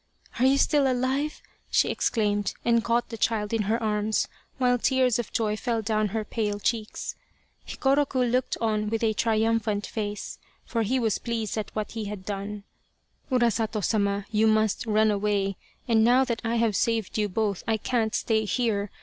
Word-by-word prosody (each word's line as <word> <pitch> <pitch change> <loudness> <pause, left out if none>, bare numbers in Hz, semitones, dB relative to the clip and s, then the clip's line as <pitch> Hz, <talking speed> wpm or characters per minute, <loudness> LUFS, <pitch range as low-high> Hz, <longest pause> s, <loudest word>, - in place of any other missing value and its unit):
" - - -15
Are 255 - +5
you 270 +1 +4
still 275 -1 +3
alive? 265 +4 -1
" - - -36
she - - +3
exclaimed, 205 -4 0
and 235 -1 +3
caught 235 +1 0
the 225 - -7
child 210 -1 0
in 225 - +2
her 225 - +3
arms 210 0 0 0.3
while 250 -1 +2
tears 255 -2 +2
of 235 - -4
joy 215 -2 0
fell 230 0 -2
down 215 0 +1
her 215 +2 -3
pale 210 -3 -2
cheeks. 220 0 -2 0.5
Hikoroku 275 -1 +1
looked 250 +1 0
on 215 -2 0
with 225 +1 -1
a 220 -1 +2
triumphant 220 -1 +1
face, 210 -2 -5 0.3
for 230 - -1
he 235 +5 +1
was 225 -4 0
pleased 230 -3 -3
at 215 -1 -3
what 215 -1 -3
he 225 -2 -4
had 200 -2 -6
done. 205 0 -5 0.3
" - - -38
Urasato 225 -4 +1
Sama, 200 -1 +1
you 220 0 +3
must 215 0 +2
run 215 0 +3
away, 200 -1 0 0.3
and 225 -2 +4
now 250 +3 +5
that 235 -2 -2
I 230 0 0
have 225 -3 +2
saved 225 -2 0
you 210 -1 +1
both 205 -1 -1
I 225 -1 +2
can't 220 0 -1
stay 220 -1 +1
here. 210 -3 0
220 Hz, 185 wpm, -26 LUFS, 210-235 Hz, 0.5 s, Are